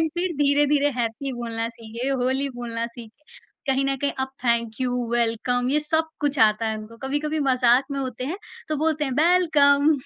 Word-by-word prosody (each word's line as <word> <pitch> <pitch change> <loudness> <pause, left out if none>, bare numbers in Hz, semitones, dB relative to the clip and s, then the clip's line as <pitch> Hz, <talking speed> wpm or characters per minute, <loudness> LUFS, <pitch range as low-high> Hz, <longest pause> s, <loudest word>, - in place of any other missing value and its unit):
लेकिन 320 - +2
फिर 360 0 0
धीरे-धीरे 290 0 +3
हैप्पी 240 +4 -2
बोलना 230 -2 -3
सीखे, 230 +3 -5
होली 265 +1 0
बोलना 230 -1 -3
सीखे। 235 +4 -13 0.4
कहीं 270 0 +1
न 275 0 0
कहीं 285 - +1
अब 265 - -1 0.2
थैंक 235 -1 0
यू, 250 -1 0 0.2
वेलकम, 240 +1 0
ये 300 - +2
सब 320 +2 0
कुछ 290 -1 0
आता 220 0 +4
है 220 0 -1
उनको। 215 +2 -11
कभी-कभी 300 +3 -1
मज़ाक 255 0 +4
में 280 - -2
होते 255 -2 -4
हैं, 325 +9 -4 0.3
तो 310 - -1
बोलते 310 0 0
हैं, 265 -3 -2
"बेलकम।" 305 -2 +4
265 Hz, 185 wpm, -24 LUFS, 235-290 Hz, 0.4 s, आता